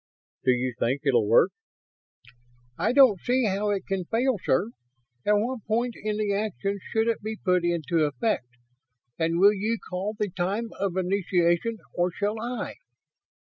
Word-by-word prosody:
"Do - - +3
you 125 0 +1
think 130 +4 0
it'll 120 -6 +3
work?" 115 - +5 1.2
"I 215 - +1
don't 255 -7 +6
see 250 +4 +1
how 205 +1 0
it 200 -2 -1
can 195 -2 -2
fail, 235 +2 +1
sir. 200 - +1 0.6
At 210 - +5
what 225 +2 0
point 235 +3 0
in 215 -1 -3
the 210 -1 0
action 200 - -2
should 225 0 +1
it 230 - 0
be 220 +1 -4
put 180 -3 +1
into 170 -1 +1
effect? 145 - -1 0.7
And 165 +1 +1
will 200 +3 +6
you 215 +3 -1
call 195 +2 -4
the 210 -3 -2
time 200 +6 -2
of 190 -2 -1
initiation, 185 +2 +1 0.2
or 175 +1 +1
shall 205 +4 -2
I?" 240 +1 -4
200 Hz, 160 wpm, -26 LUFS, 175-220 Hz, 1.2 s, don't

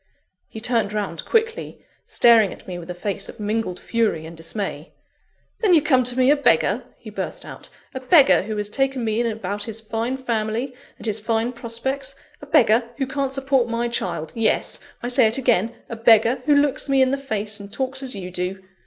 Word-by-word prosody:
He 220 - -9
turned 225 -2 +1
round 205 -5 -3
quickly, 455 0 -1 0.2
staring 225 -4 +5
at - - -12
me 180 -1 -5
with 170 0 -11
a 180 - -4
face 200 +2 -3
of - - -11
mingled 210 -3 -2
fury 225 -9 -1
and 165 +1 -9
dismay. 165 +5 -5 0.7
"Then 395 -6 +4
you 315 - +5
come 260 -4 +3
to 250 +1 +2
me 255 +2 +5
a - - +5
beggar!" 285 - +2
he - - -11
burst - - -4
out; - - -11 0.2
"a 260 - -4
beggar 260 - +5
who 215 +2 -5
has 210 0 -1
taken 270 +2 -1
me 220 0 0
in 240 - +1
about 205 -2 -3
his 225 -1 -6
fine 225 +3 -3
family, 235 0 -2 0.2
and - - -8
his 215 -1 -1
fine 225 +2 -1
prospects; 265 +4 -3 0.3
a 290 - -10
beggar 230 -3 +4
who 270 - 0
can't 270 0 -2
support 270 -3 +1
my 230 +1 -1
child 160 -9 -3
Yes! 225 -1 0 0.2
I - - -2
say 250 -1 +4
it 220 - 0
again, 235 -4 +1
a 230 - -6
beggar 230 +2 +4
who 295 - +5
looks 285 0 +1
me 270 -1 +4
in 260 - +1
the 275 - 0
face, 215 -5 -3
and 200 0 -10
talks 265 +2 -3
as 260 -4 -2
you 185 -2 -6
do. 180 +2 -3
230 Hz, 205 wpm, -22 LUFS, 210-265 Hz, 0.7 s, staring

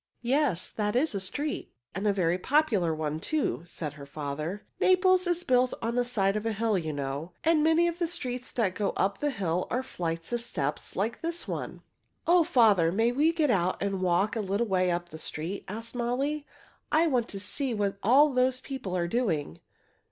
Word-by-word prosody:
"Yes, 255 - +1
that 210 0 -1
is 275 +2 +2
a 200 - -1
street, 285 +11 -2 0.2
and 195 +4 -2
a - - +5
very 180 -2 +1
popular 225 - +2
one, 155 -1 -2
too," 300 - -1
said 150 -4 -5
her 145 -2 -10
father. 150 +6 -5
"Naples 370 0 +4
is 350 0 +1
built 255 -5 +2
on 230 0 -2
the 245 0 +2
side 200 -5 +1
of 215 - -2
a 225 -1 -1
hill, 220 0 +1
you 160 -4 -1
know, 145 +4 -4
and 325 -1 +4
many 325 +2 +4
of 340 0 -3
the 340 - +1
streets 255 -6 -3
that 210 -6 +1
go 205 +1 -1
up 195 +1 0
the 295 - 0
hill 180 - -1
are 255 +2 -1
flights 165 -5 -4
of 240 - 0
steps 150 -10 -3
like 220 +5 -2
this 335 +1 -3
one." - - -5 0.4
"O 345 0 +5
father, 210 - +4
may 225 +5 +2
we 295 +6 +3
get 315 -5 +1
out 185 -4 +1
and 195 -1 -2
walk 185 +4 +2
a 225 - 0
little 200 +3 0
way 185 -3 +1
up 175 0 -2
the 160 - -9
street?" 165 +6 -4
asked 225 +4 -6
Molly. 270 +5 -1 0.4
"I 320 +2 +4
want 250 -7 +1
to 195 - -5
see 245 +5 -2
what 200 -1 -1
all 275 +7 +5
those 255 0 +2
people 255 -9 -4
are 170 -1 0
doing." 170 - -1
215 Hz, 205 wpm, -28 LUFS, 180-270 Hz, 0.4 s, a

